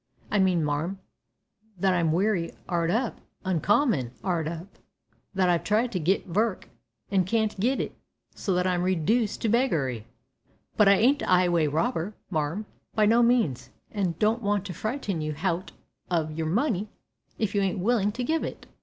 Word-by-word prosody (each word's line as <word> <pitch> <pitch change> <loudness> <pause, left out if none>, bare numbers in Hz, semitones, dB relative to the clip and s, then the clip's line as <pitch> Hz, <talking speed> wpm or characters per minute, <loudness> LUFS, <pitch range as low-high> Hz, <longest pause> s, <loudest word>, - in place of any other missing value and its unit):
"I 210 - +2
mean, 185 -4 +3
marm, 150 +6 -1 0.8
that 190 +1 +2
I'm 170 -3 +2
wery 180 0 +1
'ard 170 -2 0
up. 230 +6 -1 0.2
Uncommon 185 - +2
'ard 170 -4 0
up; 170 +4 -7 0.6
that 190 -1 +3
I've 175 -1 +2
tried 225 +3 +1
to 185 - -1
git 180 +5 +1
vork 205 +3 -1 0.4
an' 190 -2 +3
can't 215 +2 0
git 255 +6 +1
it, - - -3 0.4
so 190 - -1
that 180 0 +1
I'm 180 -1 +1
redooced 190 +7 +1
to - - +2
beggary. 145 - +1 0.7
But, 210 - +5
I 200 - +8
ain't 270 +8 +3
a - - -2
'ighway 175 -3 +4
robber, 180 - -1 0.2
marm, 160 +6 -1 0.3
by 215 -1 +4
no 230 +3 +5
means, 235 - +2 0.2
an' 190 -5 -1
don't 220 +3 +2
want 205 -2 0
to 185 - -5
frighten 215 - -3
you 155 0 -2
hout 170 +2 -2 0.4
o' 165 -3 0
your 160 +1 -3
money 215 - 0 0.5
if 215 -3 -1
you 205 - +2
ain't 195 -2 0
willin' 210 +1 +2
to 250 +2 -3
give 320 +5 0
it." - - -6
190 Hz, 170 wpm, -27 LUFS, 170-215 Hz, 0.8 s, I